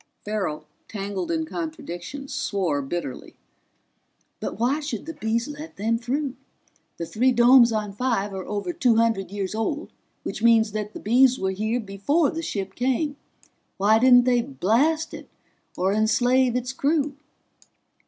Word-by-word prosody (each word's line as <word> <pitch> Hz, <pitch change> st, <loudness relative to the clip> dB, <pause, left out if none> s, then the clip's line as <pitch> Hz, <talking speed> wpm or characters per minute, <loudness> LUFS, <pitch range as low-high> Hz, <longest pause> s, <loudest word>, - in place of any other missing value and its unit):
Farrell, 190 Hz, -8 st, -3 dB, 0.2 s
tangled 200 Hz, -3 st, -4 dB
in 320 Hz, -1 st, 0 dB
contradictions, 285 Hz, -, -6 dB
swore 175 Hz, -8 st, -1 dB
bitterly. 135 Hz, -1 st, -5 dB, 1.0 s
"But -, -, -5 dB
why 250 Hz, +7 st, +1 dB
should 305 Hz, 0 st, -5 dB
the 325 Hz, -, -6 dB
Bees 230 Hz, -1 st, -1 dB
let 295 Hz, +2 st, -8 dB
them 225 Hz, +3 st, 0 dB
through? 265 Hz, +3 st, -2 dB, 0.6 s
The 170 Hz, -, -4 dB
three 245 Hz, +9 st, +2 dB
domes 240 Hz, 0 st, +6 dB
on 210 Hz, -2 st, -2 dB
Five 205 Hz, -3 st, -1 dB
are 190 Hz, -1 st, -6 dB
over 200 Hz, -4 st, -3 dB
two 240 Hz, +3 st, +3 dB
hundred 225 Hz, -5 st, +1 dB
years 195 Hz, -1 st, -4 dB
old, 285 Hz, +8 st, -3 dB, 0.3 s
which -, -, -5 dB
means 225 Hz, -2 st, +4 dB
that 210 Hz, 0 st, -4 dB
the -, -, -7 dB
Bees 250 Hz, +4 st, +4 dB
were 190 Hz, 0 st, -1 dB
here 215 Hz, +5 st, -1 dB
before 240 Hz, -, 0 dB
the 325 Hz, -, -4 dB
ship 195 Hz, -, -4 dB
came. 265 Hz, +5 st, 0 dB, 0.6 s
Why 215 Hz, +3 st, +4 dB
didn't 245 Hz, 0 st, +7 dB
they 245 Hz, -1 st, +3 dB
blast 280 Hz, -, +1 dB
it 310 Hz, -, -9 dB, 0.5 s
or 190 Hz, +2 st, +1 dB
enslave 245 Hz, +4 st, +2 dB
its 250 Hz, +1 st, -2 dB
crew?" 285 Hz, 0 st, 0 dB
230 Hz, 150 wpm, -24 LUFS, 200-270 Hz, 1.0 s, didn't